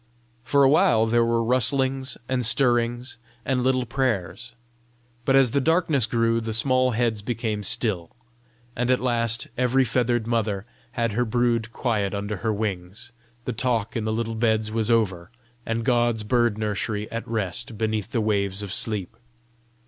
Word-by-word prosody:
For 140 +3 +3
a - - +7
while 115 -5 +4
there 115 +1 +3
were 115 0 +1
rustlings 130 +2 +1
and 130 -1 -1
stirrings 120 0 +1 0.3
and 130 -2 0
little 130 0 +1
prayers; 120 -1 -2 0.7
but 135 - +3
as 135 -3 +5
the 140 - +1
darkness 160 -5 +2
grew, 115 0 +1
the 110 -1 -1
small 130 +2 +3
heads 115 -3 0
became 110 -1 -3
still, 95 -4 0 0.7
and 125 +1 -1
at 130 - +3
last 120 +1 0
every 130 +1 +3
feathered 120 -1 0
mother 110 -4 -1 0.3
had 115 -1 0
her 120 +4 +1
brood 115 -1 0
quiet 105 -6 -1
under 100 +1 -3
her 110 +4 -1
wings, 100 +1 -4 0.3
the 125 - -2
talk 115 -1 -1
in 115 - -1
the 110 - -1
little 115 0 -2
beds 110 -1 0
was 110 0 -1
over, 95 -7 +1 0.4
and 115 0 -2
God's 120 -3 +2
bird 120 -1 +1
nursery 105 0 -2
at 115 +1 -5
rest 110 +1 -3
beneath 110 0 -2
the 120 -5 0
waves 100 -2 0
of 100 - -5
sleep. 105 -5 -1
115 Hz, 160 wpm, -24 LUFS, 110-125 Hz, 0.7 s, a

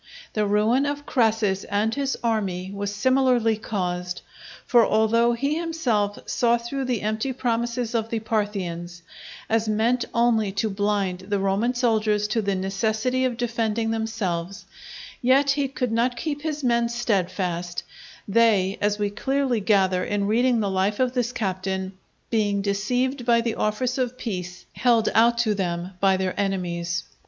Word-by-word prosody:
The 210 -1 +1
ruin 220 +7 +2
of 290 0 -3
Crassus 220 -6 +1
and 210 +2 0
his 275 +1 -1
army 195 -5 -1
was 200 0 -3
similarly 250 0 +2
caused: 180 -4 -3 0.4
for 240 -3 +5
although 230 +2 +3
he 280 +6 -1
himself 245 -12 0
saw 240 -2 +2
through 260 +3 -4
the 245 -5 -1
empty 220 +5 -1
promises 240 -1 -1
of 225 -1 -1
the 230 - -1
Parthians, 185 -6 -3 0.4
as 225 0 +1
meant 230 +4 +2
only 235 -4 +2
to 205 +2 -1
blind 195 -2 -1
the 205 - +1
Roman 200 +6 0
soldiers 215 -4 +1
to 225 +1 +1
the 200 -1 0
necessity 220 +7 0
of 245 -2 -1
defending 230 -2 -1
themselves, 200 -4 -3 0.6
yet 270 +3 +4
he 280 0 0
could 255 -3 -3
not 240 +2 +1
keep 290 +1 -3
his 305 -2 -3
men 235 -1 +2
steadfast, 180 -6 -1 0.4
they, 205 -3 +3
as 205 0 +1
we 205 -1 -1
clearly 265 +2 0
gather 190 -3 +2
in 205 -1 -1
reading 235 +2 +2
the 200 -2 -1
life 190 +2 0
of 255 -1 +1
this 245 -2 0
captain, 190 -3 -3 0.4
being 205 -3 +1
deceived 245 +6 0
by 235 -1 +4
the 230 -1 -1
offers 240 +6 -1
of 250 0 -1
peace 180 -6 -5
held 235 -3 +3
out 235 +2 +4
to 230 -3 +2
them 175 -2 -2
by 195 -1 +3
their 185 -1 -1
enemies. 180 -3 -1
220 Hz, 155 wpm, -24 LUFS, 195-240 Hz, 0.6 s, for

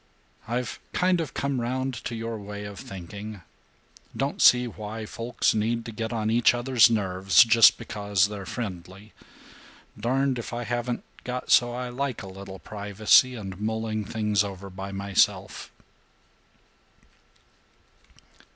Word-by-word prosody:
I've 120 +1 -3
kind 180 -1 +2
of 160 - -6
come 140 -3 -1
round 130 +2 -2
to 120 - -3
your 115 0 -4
way 105 0 -7
of 100 -1 -8
thinking. 100 +2 -8 0.8
Don't 140 +1 -2
see 125 0 +7
why 110 -1 -6
folks 115 +2 -1
need 115 +2 -1
to 115 - -6
get 110 +1 -4
on 110 -2 -1
each 120 +1 +4
other's 120 -1 +5
nerves 95 -1 +4
just 115 -1 +6
because 100 -2 0
they're 100 -2 -7
friendly. 100 -2 -7 0.8
Darned 130 +3 0
if 120 - -7
I 120 +1 -3
haven't 120 0 -3 0.2
got 125 0 -4
so 120 -1 +5
I 125 +1 -4
like 130 -2 -3
a - - -8
little 95 0 -9
privacy 105 +6 +3
and 95 -4 -7
mulling 110 0 -2
things 105 -1 0
over 100 -1 -7
by 95 +1 -7
myself." 100 0 0
110 Hz, 135 wpm, -26 LUFS, 100-120 Hz, 0.8 s, see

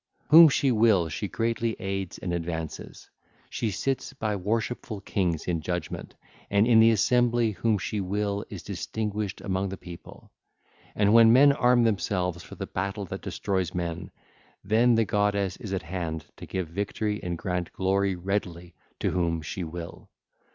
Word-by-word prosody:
Whom 165 +1 +10
she 135 -1 +2
will 105 -7 +3
she 75 - -3
greatly 115 -1 -1
aids 95 -2 -4
and 90 - -4
advances: 80 -2 -5 0.4
she 115 - -1
sits 135 +6 -2
by 110 -6 -2
worshipful 110 +2 -2
kings 90 -5 -1
in 85 -3 -1
judgement, 90 +2 -5 0.3
and 100 +1 +3
in 115 -2 +5
the 115 0 +7
assembly 120 +1 +2
whom 105 +3 0
she 100 +3 -3
will 100 +1 -2
is - - -8
distinguished 105 -2 -4
among 95 0 -1
the 95 - -6
people. 85 -2 -12 0.6
And 105 0 +3
when 115 -1 +8
men 140 +4 +7
arm 125 -3 +3
themselves 95 -5 0
for - - -11
the - - -5
battle 100 +2 -3
that - - -7
destroys 95 -4 -2
men, 85 -2 -3 0.5
then 115 +4 +4
the 115 0 +3
goddess 100 -2 0
is 105 - -8
at 95 -3 -2
hand 85 -2 -4
to - - -10
give 95 -3 -3
victory 105 +3 -2
and 90 -3 -3
grant 90 0 -3
glory 95 0 0
readily 90 -2 -3 0.3
to - - +1
whom 85 -3 0
she 90 +3 -4
will. 85 +1 -8
100 Hz, 160 wpm, -27 LUFS, 90-110 Hz, 0.6 s, Whom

